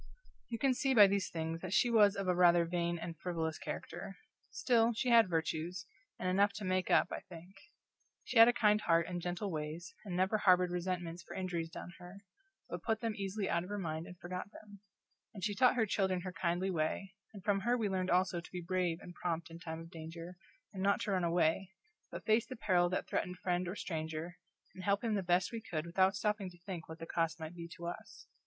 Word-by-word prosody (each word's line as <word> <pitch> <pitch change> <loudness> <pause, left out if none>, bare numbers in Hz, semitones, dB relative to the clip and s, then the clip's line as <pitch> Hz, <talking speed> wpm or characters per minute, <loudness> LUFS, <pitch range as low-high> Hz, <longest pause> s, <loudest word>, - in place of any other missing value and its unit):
You 230 - -3
can 270 +2 +3
see 265 +1 +1
by 210 -3 +10
these 200 -1 +1
things 165 0 -3
that 185 0 -4
she 240 - +4
was 210 -3 +6
of 195 -1 -3
a 180 - +4
rather 175 -1 +5
vain 170 0 -1
and 170 0 -6
frivolous 165 -3 -2
character; - - -6 0.3
still, 235 -2 +2
she 245 +3 -1
had 230 -4 +6
virtues, 165 +2 -2 0.3
and 185 - -3
enough 200 +2 +3
to 200 0 -6
make 185 0 0
up, - - +4
I - - -3
think. 175 +2 -11 0.7
She 235 - +1
had 225 - +11
a - - +6
kind 210 -3 +3
heart 165 -2 +3
and 175 0 -4
gentle 180 +3 -3
ways, 155 +2 -5
and 185 -4 -5
never 190 +4 +2
harbored 180 -2 +4
resentments 175 -1 -3
for - - -10
injuries 175 -3 -2
done 175 - -8
her, 180 +3 -11 0.4
but - - -5
put 220 -2 -1
them 230 -2 -1
easily 195 0 -2
out 170 - +1
of 180 - -8
her 205 - -3
mind 160 -3 -3
and 180 - -11
forgot 180 +3 -6
them; 205 -2 -13 0.6
and 195 - -7
she 210 0 0
taught 250 +4 +4
her 230 -3 +3
children 190 -3 0
her 185 0 -6
kindly 175 +2 0
way, 180 +3 -2 0.2
and 200 -4 -11
from 205 -2 +2
her 240 +5 +1
we 220 -3 0
learned 185 -1 -1
also 180 -1 +2
to - - -14
be 180 - -4
brave 175 -1 0
and 175 - -10
prompt 170 -1 -3
in 165 - -9
time 160 -1 -6
of 165 +1 -11
danger, 165 +2 -8 0.4
and 190 - -5
not 200 +3 +3
to 220 - -1
run 185 -2 +1
away, 170 +2 +2 0.4
but - - -8
face 220 +1 +3
the 260 - -6
peril 180 -6 +2
that 185 - -2
threatened 180 0 -2
friend 180 0 -1
or 180 - -4
stranger, 160 -1 -4 0.3
and 185 - -9
help 200 +3 +1
him 225 -2 0
the 200 - +1
best 180 0 +2
we 230 -1 -5
could 160 -7 -4
without 190 +3 +3
stopping 205 -2 -1
to 175 - -16
think 180 -5 -6
what 160 - -7
the 165 - -7
cost 165 -1 -1
might 160 +1 -6
be 170 -1 -7
to 170 +1 -9
us. 170 - -7
180 Hz, 230 wpm, -34 LUFS, 170-200 Hz, 0.7 s, had